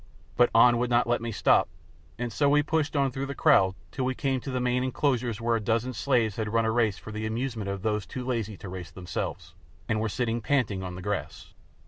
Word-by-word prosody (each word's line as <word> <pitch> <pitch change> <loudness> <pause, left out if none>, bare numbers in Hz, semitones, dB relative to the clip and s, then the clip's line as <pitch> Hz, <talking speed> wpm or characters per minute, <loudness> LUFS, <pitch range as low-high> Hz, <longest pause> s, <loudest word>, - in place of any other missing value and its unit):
But 120 0 +5
An 120 +1 +6
would 125 0 0
not 120 0 +3
let 120 -1 0
me 115 0 -3
stop, 100 - +3 0.5
and 120 -1 -4
so 145 +4 +2
we 145 +1 +4
pushed 155 0 -1
on 140 -2 +2
through 135 +2 -4
the 140 - -5
crowd 95 -5 +4 0.2
till 130 - -3
we 130 0 -1
came 135 -2 0
to 135 - -6
the 130 -1 -1
main 125 0 +1
enclosures 125 -4 0
where 115 0 +1
a - - +1
dozen 115 +4 0
slaves 115 -3 +1
had 110 -2 -2
run 115 0 +2
a 110 - +1
race 110 -4 +1
for 110 - -10
the 110 0 -3
amusement 115 -2 -3
of 100 -1 -4
those 105 -2 -1
too 125 -1 -6
lazy 115 -5 -2
to - - -9
race 90 -1 -7
themselves, 90 -2 -5 0.3
and 110 -1 0
were 110 - 0
sitting 120 +1 -1
panting 110 -6 0
on 90 -1 -5
the 90 - -8
grass. 105 0 -4
115 Hz, 235 wpm, -27 LUFS, 105-130 Hz, 0.5 s, An